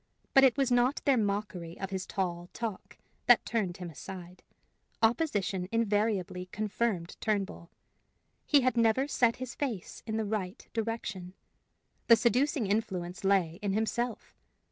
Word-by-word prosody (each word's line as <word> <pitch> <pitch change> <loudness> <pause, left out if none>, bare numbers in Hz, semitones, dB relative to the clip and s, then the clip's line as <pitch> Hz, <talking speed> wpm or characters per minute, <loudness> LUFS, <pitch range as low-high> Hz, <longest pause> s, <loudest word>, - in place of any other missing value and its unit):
But 270 - +7
it 265 -1 +5
was 270 -2 +2
not 245 +3 +3
their 280 -2 +5
mockery 200 -6 -2
of 195 +1 -4
his 190 -1 -3
tall 175 -2 -3
talk 225 -5 -5 0.3
that - - +6
turned 195 -7 -1
him 180 -2 -6
aside; 180 +3 -9 0.6
opposition 205 - +1
invariably 205 -5 0
confirmed 210 -3 -2
Turnbull. 195 -5 -2 0.8
He 290 -2 +5
had 255 0 +2
never 230 +4 +3
set 240 -5 +2
his 255 -1 -6
face 240 -11 -4
in 220 0 -1
the 220 - 0
right 205 0 -4
direction. 215 -5 -4 0.7
The 230 - +9
seducing 255 +2 +2
influence 190 -4 -2
lay 190 -3 +2
in 200 -2 -1
himself. 225 +2 -2
210 Hz, 140 wpm, -30 LUFS, 185-235 Hz, 0.8 s, The